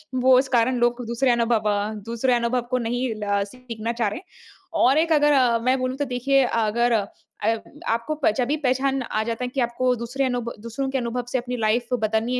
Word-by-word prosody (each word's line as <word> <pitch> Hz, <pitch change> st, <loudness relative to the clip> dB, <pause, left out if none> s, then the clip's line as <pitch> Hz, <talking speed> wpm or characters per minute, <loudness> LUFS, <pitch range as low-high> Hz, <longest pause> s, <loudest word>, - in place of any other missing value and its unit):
वो 255 Hz, 0 st, +5 dB
इस 265 Hz, -, 0 dB
कारण 245 Hz, +3 st, +2 dB
लोग 240 Hz, 0 st, +1 dB
दूसरे 240 Hz, +2 st, +1 dB
अनुभव 230 Hz, -2 st, +1 dB
अ, 205 Hz, +1 st, -1 dB
दूसरे 235 Hz, +2 st, 0 dB
अनुभव 240 Hz, +1 st, +1 dB
को 255 Hz, -, +2 dB
नहीं 245 Hz, +2 st, -1 dB
ल 200 Hz, -1 st, +1 dB
सीखना 230 Hz, -1 st, -6 dB
चाह 235 Hz, -2 st, 0 dB
रहे। 205 Hz, -, -4 dB, 0.6 s
और 270 Hz, +3 st, +4 dB
एक 330 Hz, +1 st, +2 dB
अगर 295 Hz, -1 st, +4 dB
अ, 250 Hz, -4 st, +4 dB
मैं 255 Hz, +3 st, +2 dB
बोलू 255 Hz, 0 st, -2 dB
तो 285 Hz, +1 st, -2 dB
देखिए 270 Hz, +2 st, +2 dB
अगर 230 Hz, +1 st, +1 dB
अ, 215 Hz, -3 st, +2 dB, 0.4 s
अयब 225 Hz, +1 st, +1 dB, 0.3 s
आपको 235 Hz, +7 st, -1 dB
प -, -, +6 dB
जभी 260 Hz, +3 st, +1 dB
पहचान 270 Hz, -1 st, 0 dB
आ 220 Hz, -3 st, -2 dB
जाता 230 Hz, +2 st, -3 dB
है -, -, -1 dB
कि 275 Hz, -, -2 dB
आपको 250 Hz, +1 st, +1 dB
दूसरे 245 Hz, +4 st, -3 dB
अनुभ 245 Hz, -2 st, -2 dB
दूसरों 235 Hz, +5 st, -4 dB
के 265 Hz, -, -1 dB
अनुभव 245 Hz, 0 st, -3 dB
से -, -, +1 dB
अपनी 250 Hz, 0 st, -4 dB
लाइफ़ 235 Hz, +2 st, 0 dB
बदलनी 220 Hz, +3 st, 0 dB
245 Hz, 215 wpm, -23 LUFS, 230-255 Hz, 0.6 s, प